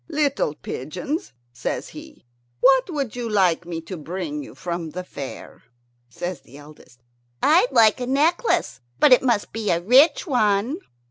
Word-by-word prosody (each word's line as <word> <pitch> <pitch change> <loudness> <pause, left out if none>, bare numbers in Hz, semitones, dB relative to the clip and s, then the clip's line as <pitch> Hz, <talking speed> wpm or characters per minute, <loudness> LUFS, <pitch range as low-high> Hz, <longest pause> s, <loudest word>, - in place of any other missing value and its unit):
"Little 285 - 0
pigeons," 180 - -5 0.2
says 120 - -4
he, 305 - -13 0.3
"what 265 - +4
would 280 - -3
you 240 -2 -4
like 180 -5 +2
me 165 -2 -4
to 180 +3 -8
bring 160 -2 -5
you - - -11
from 170 -2 -4
the 180 +4 -6
fair?" 140 -6 -9 0.5
Says 175 +5 -5
the 140 - -16
eldest, 145 -5 -16 0.4
"I'd 345 +11 +4
like 225 +1 +4
a 245 - -3
necklace, 280 - +1 0.2
but 265 - +7
it 250 - +5
must 235 -5 0
be 220 -1 -3
a 170 - +2
rich 255 - +4
one." 240 - +1
205 Hz, 155 wpm, -23 LUFS, 165-275 Hz, 0.5 s, but